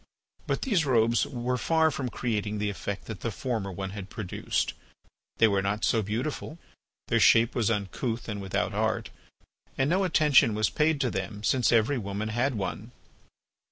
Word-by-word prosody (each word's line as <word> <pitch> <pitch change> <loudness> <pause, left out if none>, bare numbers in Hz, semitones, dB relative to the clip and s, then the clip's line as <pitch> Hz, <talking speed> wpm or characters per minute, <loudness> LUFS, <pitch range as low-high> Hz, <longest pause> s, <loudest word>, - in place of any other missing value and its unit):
But - - -1
these 205 - +2
robes 115 -4 +2
were 125 -1 -2
far 160 +5 +3
from 130 -3 -3
creating 105 -3 -2
the 105 0 -1
effect 100 0 -5
that 110 -4 -7
the 115 - -3
former 110 -3 -3
one 95 +1 -5
had 100 -1 -7
produced. 100 -5 -2 0.6
They 115 - +6
were 100 -2 +1
not 100 +2 -1
so 115 - +2
beautiful, 125 - -4 0.5
their - - +3
shape 115 +1 +5
was 115 -3 +1
uncouth 115 +3 -2
and 105 -3 -4
without 95 -2 -1
art, - - -1 0.7
and 135 +3 +1
no 190 +2 +2
attention 150 - +4
was 110 -1 +1
paid 155 -1 +2
to 125 - +1
them 100 +3 -4
since 125 +1 +2
every 120 +4 +3
woman 100 +1 -4
bad 120 +4 0
one. 105 +4 -4
115 Hz, 170 wpm, -28 LUFS, 105-130 Hz, 0.7 s, They